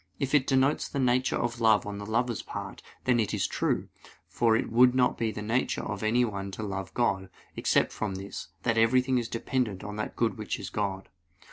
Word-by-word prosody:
If 135 0 -2
it 140 -3 +4
denotes 135 +2 +2
the - - -5
nature 130 -1 +2
of 120 0 -2
love 110 -2 +4
on 100 0 -5
the 100 - -7
lover's 120 0 0
part, - - -7 0.2
then 125 -2 +3
it 110 - 0
is - - 0
true; - - -1 0.4
for 115 -2 +2
it 115 - -1
would 125 +2 +5
not 125 -1 +3
be 115 -1 -1
in - - -7
the 105 - -4
nature 115 +4 0
of 105 -2 -4
anyone 110 -3 0
to 110 - -5
love 95 -2 -4
God, 95 -6 0 0.3
except - - +2
from 105 -3 -3
this 95 +1 -6 0.2
that 115 -2 +2
everything 125 +3 +3
is 120 - -3
dependent 115 -4 -2
on 105 0 -6
that 105 - -4
good 115 -1 0
which 105 - -3
is - - -6
God. 95 -2 -2
115 Hz, 215 wpm, -28 LUFS, 105-125 Hz, 0.4 s, would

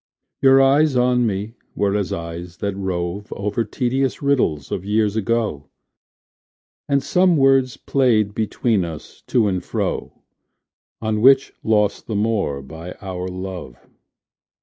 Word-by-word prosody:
Your 135 0 +6
eyes 140 +1 +4
on 125 -1 +3
me 105 +2 -3 0.2
were 100 0 +1
as 100 -4 -1
eyes 85 +1 -6
that 100 -1 -3
rove 95 +1 -3
Over 105 +4 -2
tedious 130 +4 -1
riddles 125 - 0
of 90 - -3
years 105 +1 +1
ago; 110 -9 -1 1.2
And 140 -1 +2
some 180 -2 +3
words 135 -2 +3
played 110 -7 +1
between 110 -1 0
us 80 -2 -8
to 115 -4 +2
and 95 -3 -1
fro - - -4 0.8
On 110 -1 0
which 135 +2 +5
lost 105 -2 +1
the 110 - -3
more 100 -10 0
by 80 +5 -9
our 95 -1 -6
love. 90 -8 -6
105 Hz, 130 wpm, -21 LUFS, 95-125 Hz, 1.2 s, Your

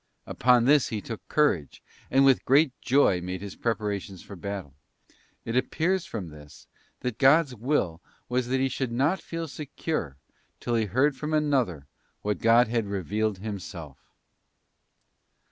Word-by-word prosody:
Upon 125 0 +3
this 145 +1 +5
he 110 - -3
took 110 +2 -8
courage, 115 - +1 0.3
and 135 +1 +4
with 135 -2 +4
great 140 +2 +4
joy 125 -9 +3
made 90 +1 -4
his 100 -2 -7
preparations 105 -4 -3
for 100 - -10
battle. 95 -6 -6 0.7
It 115 - -3
appears 170 +8 0
from 95 -7 -5
this, 75 -2 -14 0.4
that 125 -3 -3
God's 140 +1 +5
will 110 - -1 0.3
was 125 0 -1
that 130 +1 0
he 135 - +2
should 130 -2 -3
not 145 +10 +1
feel 165 -1 -5
secure 145 - -4 0.4
till 120 - -3
he 115 -2 +2
heard 130 +8 +2
from 155 +3 -2
another, 130 - 0 0.4
what 105 -3 -1
God 115 +2 +5
had 115 -2 -1
revealed 100 +2 -1
Himself. 90 -8 -7
115 Hz, 145 wpm, -27 LUFS, 100-135 Hz, 0.7 s, this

